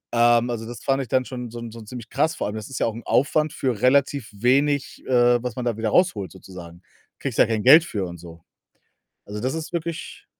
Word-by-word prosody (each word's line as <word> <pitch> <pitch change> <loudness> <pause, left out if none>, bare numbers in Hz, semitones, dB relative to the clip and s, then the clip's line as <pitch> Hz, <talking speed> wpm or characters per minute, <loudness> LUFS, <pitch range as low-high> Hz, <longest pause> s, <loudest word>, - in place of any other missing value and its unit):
Ähm, 120 +1 +4
also, 115 -1 -5
das 120 -1 -9
fand 135 0 +1
ich 130 - -5
dann 130 0 +1
schon 125 -3 -6
so 120 0 -7
so 115 0 -10
ziemlich 115 +1 -9
krass. 155 +4 0
Vor - - -3
allem, 105 - -5
das 110 -1 -7
ist 135 - -5
ja - - +2
auch 115 - -1
'n 115 - -7
Aufwand 150 +3 +2
für 125 -6 -2
relativ 135 -2 +2
wenig, 135 +6 +1
äh, 120 -1 +4
was 125 -3 -4
man 125 -1 -4
da 120 - 0
wieder 110 -1 -1
rausholt 110 - +1
sozusagen. 90 -2 -12 0.4
Kriegst - - -4
ja - - +6
kein 110 -2 -1
Geld 155 +6 +8
für 100 - -3
und 85 -1 -8
so. 85 -1 -13 0.8
Also, 105 +1 -6
das 130 +3 -1
ist 160 +2 -6
wirklich 170 -1 -5
120 Hz, 230 wpm, -23 LUFS, 110-135 Hz, 0.8 s, Geld